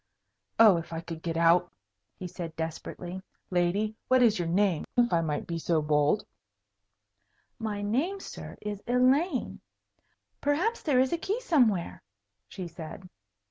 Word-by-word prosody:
"Oh, 215 -5 +7
if 165 - -6
I 165 - -3
could 165 -1 -7
get 165 -1 -3
out!" 170 +1 +4 0.5
he 185 - -7
said, 170 -2 -7
desperately. 175 +3 -5 0.3
"Lady, 185 +5 +1
what 255 -1 +5
is 220 -5 +4
your 175 - -1
name, 185 -1 +2
if 240 -3 +3
I 170 - +3
might 150 -2 -2
be 170 -1 -3
so 165 0 +1
bold." 150 +5 +2 1.3
"My 210 -2 -3
name, 285 - 0
sir, - - -9
is 210 -1 -4
Elaine. 255 +5 +2 0.8
Perhaps 345 +11 +1
there 280 -5 +2
is 260 +3 +2
a 340 - 0
key 410 +7 -1
somewhere," 245 - +1 0.5
she 185 -3 -7
said. 170 +2 -9
195 Hz, 145 wpm, -28 LUFS, 170-250 Hz, 1.3 s, Oh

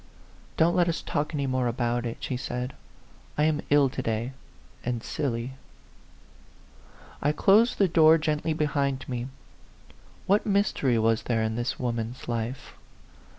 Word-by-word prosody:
"Don't 170 +2 +4
let 175 -1 +3
us 165 - -1
talk 150 -1 -2
any 145 -3 -1
more 130 -2 0
about 120 0 -1
it," 115 - -5
she 130 - -3
said. 125 0 -4 0.3
" - - -28
I 150 - +3
am 155 -1 +2
ill 145 -1 +5
to 130 0 -4
day, 115 +1 -2 0.5
and 120 -1 -2
silly." 130 -3 -3 1.7
I 145 - +2
closed 210 +9 +4
the 195 - +4
door 160 -1 +6
gently 155 0 -1
behind 140 -3 -1
me. 125 -1 -3 1.0
What 200 +2 +3
mystery 200 - +1
was 115 0 +2
there 115 -2 0
in 110 0 -1
this 120 +1 -2
woman's 120 -1 -3
life 120 +2 -4
130 Hz, 150 wpm, -27 LUFS, 120-155 Hz, 1.7 s, door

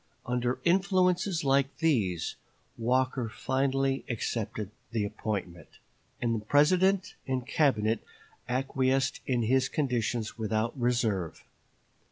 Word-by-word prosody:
Under 125 0 0
influences 185 -1 +2
like 135 0 +2
these 110 - +1 0.4
Walker 125 0 0
finally 135 +2 0
accepted 110 -3 -3 0.2
the 110 -2 -1
appointment, 95 -4 -4 0.5
and 120 -1 0
the 110 -2 -3
President 185 - +3
and 130 -2 -1
Cabinet 115 -8 +2 0.5
acquiesced 135 +1 +1
in 125 -3 +1
his 130 +3 +2
conditions 120 -5 -1
without 110 +1 -1
reserve. 115 - 0
125 Hz, 100 wpm, -29 LUFS, 110-140 Hz, 0.5 s, President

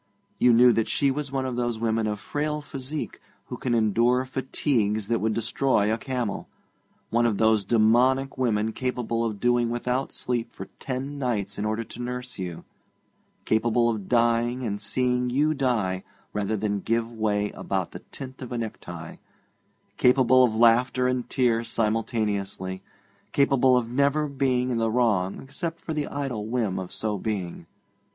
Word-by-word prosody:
You 125 - +6
knew 120 +1 +7
that 115 -1 +1
she 140 -1 +2
was 145 0 -3
one 135 -1 -1
of 130 -2 -3
those 120 -2 -1
women 110 -1 0
of 105 -1 -2
frail 150 +4 -2
physique 145 0 -6 0.2
who - - -6
can 120 -2 0
endure 115 +4 +3
fatigues 125 -5 -1
that 115 - +2
would 110 0 0
destroy 115 -2 +1
a - - 0
camel; 125 -4 -3 0.6
one 120 +1 +3
of 105 -3 0
those 110 -2 +3
dæmonic 125 +4 +3
women 110 -4 0
capable 120 -2 -2
of 110 -3 -2
doing 120 0 +2
without 125 +3 -1
sleep 120 -2 -2
for - - -9
ten 135 +2 -4
nights 105 -7 -2
in 105 - -1
order 110 +2 -1
to 120 - -9
nurse 125 -3 -5
you; 90 -3 -5 0.8
capable 115 +2 +2
of 110 -4 -3
dying 120 +1 +2
and 100 -2 -3
seeing 125 +4 +1
you 150 +5 +2
die 115 -10 0 0.3
rather 105 +1 -1
than 105 0 -1
give 115 +3 -1
way 105 -2 0
about 95 -3 -3
the - - -8
tint 130 0 -8
of 130 - -7
a 120 - -2
necktie; 85 -7 -6 0.8
capable 130 0 +5
of 115 -3 +2
laughter 120 +2 +4
and 125 -1 -1
tears 115 -3 +1
simultaneously; 105 -4 -1 0.5
capable 135 -2 +4
of 120 -2 0
never 140 +4 +1
being 130 -2 0
in 120 - 0
the 115 0 +1
wrong 110 -6 +1
except 165 +5 -4
for 160 - -5
the 150 -2 -2
idle 130 -7 -3
whim 110 -6 -1
of 90 -1 -6
so 105 -2 -2
being. 90 -6 -4
120 Hz, 165 wpm, -26 LUFS, 110-130 Hz, 0.8 s, knew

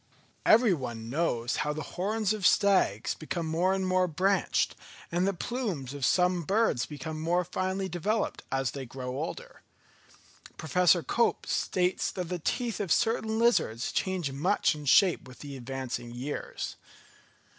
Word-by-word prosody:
Every 220 -2 +6
one 120 -6 -5
knows 125 -6 0
how 150 0 0
the 155 0 -5
horns 210 +3 0
of 215 -2 -5
stags 190 - +3
become 165 +2 -4
more 165 +4 +1
and 190 0 0
more 185 0 +2
branched, 185 +4 +1 0.4
and 175 +3 +1
the - - +3
plumes 180 - -3
of 140 -2 -6
some 180 -1 +3
birds 195 - +1
become 155 +1 -6
more 175 +2 +1
finely 190 +2 -2
developed, 205 +6 -1
as 135 -1 0
they 135 -2 -6
grow 125 +1 -6
older. 170 - -6 1.0
Professor 175 +1 +3
Cope 235 - +1
states 180 0 0
that 180 -3 -4
the 180 -1 -3
teeth 235 - -2
of 195 -5 -2
certain 220 +1 +1
lizards 225 - +2
change 185 -7 -1
much 165 +10 +2
in 150 -1 -8
shape 175 +1 +4
with 130 +2 -12
advancing 130 -3 -5
years. 125 +5 -5
175 Hz, 145 wpm, -29 LUFS, 140-195 Hz, 1.0 s, Every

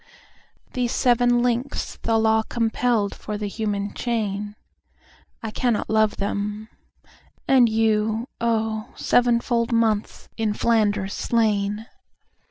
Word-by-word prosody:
These 245 -1 -1
seven 245 -1 +3
links 245 +2 -2
the 225 -1 0
Law 220 0 +3
compelledFor 225 -2 -1
the 210 - -4
human 205 -1 -3
chain—I 215 0 -6
cannot 235 -1 -1
love 220 -1 +2
them; 205 +2 -3 0.8
and 255 -3 +5
you, 220 +1 +1
oh, 220 -1 -1
Seven 240 -1 +3
fold 235 -1 0
months 225 -2 0
in 220 -2 0
Flanders 205 -4 +1
slain! 210 -2 0
220 Hz, 100 wpm, -23 LUFS, 210-235 Hz, 0.8 s, and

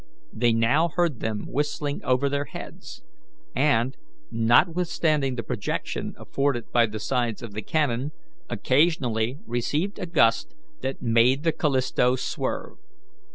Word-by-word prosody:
They 120 +1 +2
now 120 +9 +3
heard 170 -6 0
them 110 -2 -3
whistling 145 0 -2
over 130 +2 +2
their 140 +1 -1
heads, - - -10 0.5
and, 135 -3 +2 0.4
notwithstanding 150 +3 +2
the 115 - -4
protection 110 -2 -3
afforded 135 -4 -1
by 120 -1 +4
the 110 0 -6
sides 120 -1 -1
of 115 -3 -7
the 110 - -4
canon, 140 +1 0 0.4
occasionally 130 -5 +1
received 145 - -1
a 180 - -4
gust 115 - +2 0.3
that 130 0 -4
made 120 +4 +3
the 165 - +3
Callisto 130 -4 +1
swerve. 125 - -4
130 Hz, 125 wpm, -25 LUFS, 115-150 Hz, 0.5 s, by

